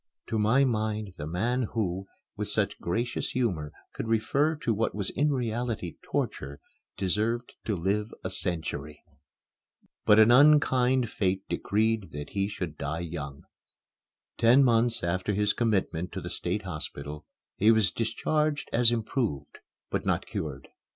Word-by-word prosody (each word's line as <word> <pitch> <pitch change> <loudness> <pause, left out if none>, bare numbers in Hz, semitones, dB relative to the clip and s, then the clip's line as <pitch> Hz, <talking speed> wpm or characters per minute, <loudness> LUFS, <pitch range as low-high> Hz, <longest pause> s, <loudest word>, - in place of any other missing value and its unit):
To 110 - 0
my 110 +6 +4
mind, 110 -4 -1
the 75 - -5
man 115 +9 0
who, 95 -4 -1 0.3
with - - -3
such - - -1
gracious 115 +7 -2
humor, 90 -13 -1 0.2
could - - -4
refer 135 +8 +2
to 120 -6 -1
what 110 +2 -1
was 100 -3 -2
in 145 +3 +1
reality 120 - -2
torture 70 +2 -3 0.4
deserved 110 +6 0
to 105 - 0
live 100 +5 -1
a - - -3
century. 75 -4 -3 1.0
But 105 - +7
an 110 +2 +7
unkind 130 -3 +5
fate 95 -1 0
decreed 110 -1 0
that 75 0 -6
he 100 0 0
should 90 -7 -5
die 75 +4 -2
young. 75 -5 -6 1.0
Ten 125 +4 +6
months 115 -3 +3
after 90 +4 0
his 105 0 +2
commitment 95 -7 0
to - - -4
the - - -6
State 95 +4 -2
Hospital 75 -3 -6 0.3
he 105 - +4
was 110 -5 +4
discharged 145 +7 -1
as 120 0 +5
improved 110 - -2 0.3
but - - -1
not - - 0
cured. 70 -4 -5
105 Hz, 145 wpm, -28 LUFS, 85-120 Hz, 1.0 s, But